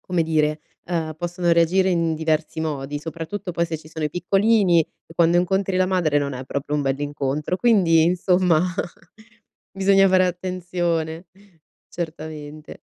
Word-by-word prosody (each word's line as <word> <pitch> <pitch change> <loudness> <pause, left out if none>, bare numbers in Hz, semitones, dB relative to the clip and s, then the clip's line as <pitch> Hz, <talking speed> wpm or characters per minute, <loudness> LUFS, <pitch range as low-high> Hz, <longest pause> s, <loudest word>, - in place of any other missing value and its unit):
come 180 -2 -1
dire, 155 -1 0 0.2
ehm, 160 -3 -3
possono 175 +1 -1
reagire 180 +3 +3
in 165 -2 +1
diversi 160 0 -1
modi, 145 -2 -3
soprattutto 165 +5 -6
poi 170 0 0
se 160 -1 -4
ci 155 - -15
sono 155 0 -5
i 150 - -1
piccolini, 195 +1 +3
e 165 +1 -8
quando 170 +1 +3
incontri 190 +1 +1
la 185 - +3
madre 175 -6 +1
non 140 -1 -2
è 130 +1 -6
proprio 140 +3 -3
un 145 - 0
bell'incontro, 145 +3 -2
quindi, 185 -8 +4
insomma, 180 -1 +2 1.1
bisogna 195 0 +4
fare 185 0 +4
attenzione, 175 -2 -3 0.6
certamente. 155 -2 -7
165 Hz, 145 wpm, -22 LUFS, 155-180 Hz, 1.1 s, quindi